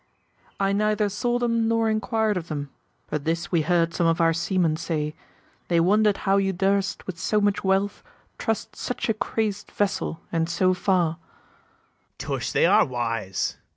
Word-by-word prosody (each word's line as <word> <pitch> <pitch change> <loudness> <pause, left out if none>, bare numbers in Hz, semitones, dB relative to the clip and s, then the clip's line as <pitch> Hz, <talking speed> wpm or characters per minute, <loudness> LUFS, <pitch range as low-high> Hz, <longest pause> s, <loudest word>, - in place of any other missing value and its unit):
I 195 0 +2
neither 210 0 +1
saw 240 +4 0
them, 230 -2 +1
nor 230 0 +2
inquir'd 220 0 +1
of 170 -2 -4
them: 145 -3 -5 0.4
But 150 -2 -2
this 165 +2 -2
we 170 -3 +3
heard 170 +1 +1
some 170 - +1
of 165 +1 +2
our 165 -1 +4
seamen 170 -1 +1
say, 150 -2 -2 0.5
They 170 -1 +2
wonder'd 205 +4 +3
how 195 0 +4
you 195 -1 +1
durst 195 +1 0
with 180 -3 -6
so 210 - +1
much 205 -1 +1
wealth 195 +1 +1 0.4
Trust 220 -1 -2
such 250 - -3
a - - +4
crazed 215 -1 -2
vessel, 200 -5 -1
and 165 -1 0
so 185 +2 +2
far. 180 -3 +1
BARABAS. 165 - -35
Tush, - - -3
they - - +3
are - - +6
wise! 115 -6 -2
190 Hz, 170 wpm, -25 LUFS, 165-210 Hz, 0.5 s, are